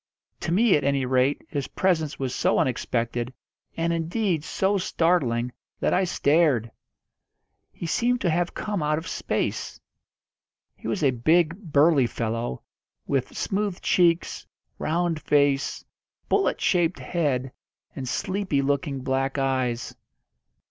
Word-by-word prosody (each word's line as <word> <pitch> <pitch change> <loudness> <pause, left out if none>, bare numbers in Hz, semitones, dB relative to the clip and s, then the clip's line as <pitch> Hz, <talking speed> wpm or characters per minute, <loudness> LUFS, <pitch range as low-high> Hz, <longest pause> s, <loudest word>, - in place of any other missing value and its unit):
To - - -3
me 210 +3 +4
at 145 - +1
any 140 -1 +1
rate 130 +2 +1
his 140 -3 -3
presence 160 -6 0
was 130 -2 -3
so - - +2
unexpected, 120 -1 -1 0.5
and, 165 +1 +1
indeed, 170 0 0
so 195 +4 0
startling, 135 -10 +1 0.3
that - - +1
I 190 - +3
stared. 145 -8 +2 1.0
He - - -7
seemed 240 +8 +1
to 180 - +1
have 175 +2 0
come 205 -4 -2
out 150 0 +1
of 160 +3 -5
space. - - -2 1.0
He - - -9
was 185 - -1
a 135 - +5
big, 160 +7 +2 0.2
burly 145 -3 +5
fellow, 115 - -3 0.4
with 135 -3 -2
smooth 200 -2 -1
cheeks, 170 -2 +2 0.3
round 165 0 0
face, 140 -2 +1 0.4
bullet - - +1
shaped 175 -1 +2
head, 135 -7 -1 0.4
and 130 -2 -4
sleepy 185 -4 -1
looking 140 -1 -1
black 135 +1 -1
eyes. 130 -3 -1
150 Hz, 130 wpm, -25 LUFS, 130-175 Hz, 1.0 s, a